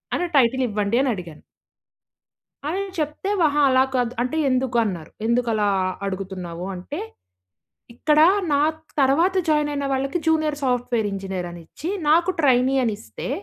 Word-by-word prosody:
అని 355 - -1
టైటిల్ 260 +1 +3
ఇవ్వండి 210 +1 0
అని 270 - +1
అడిగాను... 170 -4 -9 1.2
అని 365 +6 -1 0.2
చెప్తే, 305 +5 -2
అహా, 295 -2 +3
అలా 260 0 +5
కాదు 245 -1 0
అంటే 255 +6 -1
"ఎందుకు 255 -1 0
అన్నారు? 175 -7 -5
ఎందుకు 235 +1 +1
అలా 210 -1 +1 0.4
అడుగుతున్నావు?" 185 -3 -5
అంటే 280 - -6 1.0
ఇక్కడ 300 +4 +2 0.3
నాకు 310 +2 +1 0.2
తరువాత 325 +8 +3
జాయిన్ 300 -1 +2
అయిన 280 -1 -2
వాళ్ళకి 270 +4 -1
జూనియర్ 310 -2 +2
సాఫ్ట్‌వేర్ 245 -3 0
ఇంజనీర్ 190 -2 -4
అని 175 0 -10
ఇచ్చి. 320 - -6 0.2
నాకు 340 +3 +4
ట్రైనీ 260 -1 +3
అనిస్తే. 220 +1 -5
255 Hz, 140 wpm, -23 LUFS, 205-300 Hz, 1.2 s, అలా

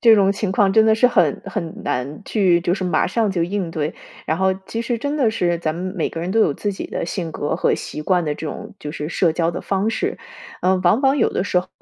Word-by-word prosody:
这 230 -2 +7
种 195 -2 +4
情 200 -1 -2
况 195 0 +3
真 220 - +6
的 220 0 +5
是 235 +3 +5
很 245 - +2
很 170 -7 -5
难 135 +4 -3
去 185 -5 +3
就 175 +1 +1
是 190 - -3
马 175 -3 +2
上 215 +1 +1
就 175 -3 0
应 185 -1 -2
对， 155 0 -2 0.3
然 160 - +1
后 190 0 +2
其 230 +3 -3
实 235 0 -1
真 285 +4 -2
的 250 -7 +3
是， 175 -5 0
咱 155 -2 -2
们 185 +2 -4
每 165 - -1
个 165 - -5
人 175 +2 -3
都 225 - +3
有 155 - +4
自 205 +8 -3
己 - - -5
的 - - -4
性 170 -5 -4
格 145 - -2
和 - - +2
习 150 - -6
惯 180 +2 +2
的 150 - -1
这 155 - -6
种 - - -7
就 150 0 -6
是 150 -1 -4
社 170 -1 +2
交 165 +1 +1
的 170 - -6
方 195 +2 0
式。 225 - -2 0.4
呃， 185 +1 +3
往 190 +8 +4
往 270 0 +3
有 245 - +2
的 - - -1
时 190 -2 +1
候， 180 - -4
185 Hz, 290 characters per minute, -21 LUFS, 165-215 Hz, 0.4 s, 这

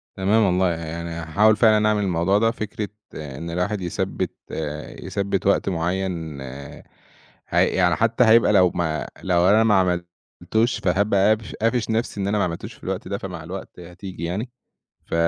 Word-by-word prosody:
تمام 100 +4 +3
والله 90 -1 +2
يعني 85 0 -4
هاحاول 85 +7 +2
فعلًا 110 -1 +4
أعمل 105 -1 +1
الموضوع 95 +1 +2
ده، 115 +2 +3
فكرة 110 -2 -4 0.3
إن 75 +2 -6
الواحد 95 +4 -1
يثبِّت 90 -1 -2 0.2
آآ، 75 -1 -6
يثبِّت 100 -1 -1
وقت 100 - +2
معيّن 85 -4 -2
آآ 65 +1 -9 0.7
هي - - +3
يعني 90 -1 +2
حتى 115 +2 +2
هيبقى 110 -1 +5
لو 90 -3 +5
ما 80 -3 -1 0.2
لو 90 -1 +3
أنا 110 +2 +5
ما 110 -2 +4 0.7
عملتوش 115 +3 +1
فهابقى 100 +2 +2
قافش 110 -1 -1
قافش 115 +1 0
نَفْسي 110 -2 -1
إن 100 - -1
أنا 105 +1 +1
ما - - +2
عملتوش 85 -1 -4
في - - -21
الوقت 95 -1 -4
ده 100 +1 -2
فمع 90 -4 -7
الوقت 90 +3 -8
هتيجي 90 0 -9
يعني. 95 +9 -3 0.6
ف - - -9
95 Hz, 170 wpm, -23 LUFS, 85-105 Hz, 0.7 s, هيبقى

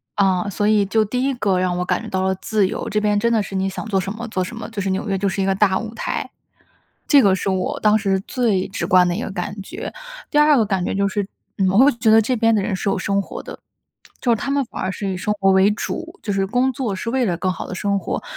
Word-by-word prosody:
啊， 195 -1 +2
所 205 +2 -1
以 210 -1 +3
就 215 +3 +2
第 250 +4 -2
1 270 0 +1
个 195 -6 +1
让 180 -1 0
我 180 - 0
感 - - 0
觉 - - -8
到 190 0 -1
了 190 0 +1
自 205 +1 0
由， - - -4
这 210 +1 0
边 210 -1 +2
真 235 +3 +1
的 215 -2 +2
是 195 - -9
你 190 0 0
想 190 - -5
做 195 -3 +1
什 195 +2 -3
么 225 +2 -6
做 190 -3 -2
什 185 +6 -4
么， 225 - -7
就 215 -3 -4
是 195 - -2
纽 190 +2 -2
约 195 - 0
就 200 +1 0
是 195 - -1
一 190 - +1
个 195 - +2
大 190 -1 +2
舞 225 0 -6
台， - - -3 0.8
这 285 -3 +6
个 195 -2 +4
是 195 - -2
我 185 -1 -1
当 215 0 +4
时 195 -3 0
最 215 -5 0
直 195 - -3
观 180 -1 +5
的 175 - 0
一 225 - -3
个 - - -4
感 200 0 -5
觉。 360 - -7 0.4
第 295 - +1
2 300 -1 +6
个 225 - +3
感 190 -3 -1
觉 - - -2
就 200 0 +1
是， 200 0 -2 0.3
呃， 195 - +2
我 195 - +3
会 275 +3 +7
觉 225 -1 +1
得 225 0 +7
这 255 +4 -1
边 225 0 +3
的 205 - +2
人 200 0 -2
是 195 - -4
有 - - 0
生 200 +1 0
活 - - -8
的。 - - -9 0.6
就 245 - +1
是 230 - +3
他 275 +6 -3
们 280 -1 +1
反 - - -7
而 190 - -1
是 195 0 -3
以 185 - -3
生 210 +4 -1
活 195 - +4
为 190 +1 +5
主， 335 - -5
就 205 - -2
是 195 -1 0
工 250 +5 +1
作 235 -5 -2
是 210 +5 -4
为 255 0 +1
了 175 -5 0
更 185 +1 -1
好 - - -6
地 185 - -6
生 200 +1 0
活。 - - -4
200 Hz, 315 characters per minute, -21 LUFS, 190-225 Hz, 0.8 s, 会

